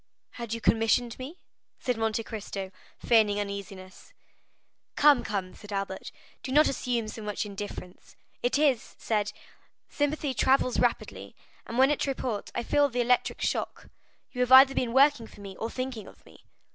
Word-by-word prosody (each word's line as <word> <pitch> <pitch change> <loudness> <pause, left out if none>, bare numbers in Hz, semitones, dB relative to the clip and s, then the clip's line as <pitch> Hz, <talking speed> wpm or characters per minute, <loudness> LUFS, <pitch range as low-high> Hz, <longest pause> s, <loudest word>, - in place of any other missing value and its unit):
"Had 235 -2 -7
you - - -5
commissioned 230 +2 +1
me?" 280 +8 -8 0.4
said 250 - -1
Monte 225 0 -1
Cristo, 200 -4 -6 0.3
feigning 215 -3 +3
uneasiness. 200 -2 -7 0.8
"Come, 290 -4 +5
come," 195 -3 -3
said 210 -1 -13
Albert, 195 -1 -4 0.3
"do 260 - -6
not 300 +3 +5
assume 240 -4 -2
so 220 - -7
much 210 0 -3
indifference. 200 -3 -8 0.3
It 245 +3 +1
is 280 -6 +1
said, 210 -2 -1 0.6
sympathy 290 -1 -1
travels 260 +1 +2
rapidly, - - -2 0.3
and 235 - -5
when 265 +2 +5
at 295 - 0
Tréport, 255 -6 -3
I - - -1
felt 285 +1 +2
the 245 - +1
electric 250 +1 +1
shock; - - -3 0.4
you 250 - -3
have 250 0 0
either 265 +1 +9
been 250 -3 -1
working 270 -2 +4
for - - -16
me 195 -1 -9
or 225 - -3
thinking 255 -5 -5
of - - -17
me." - - -19
235 Hz, 160 wpm, -28 LUFS, 210-260 Hz, 0.8 s, either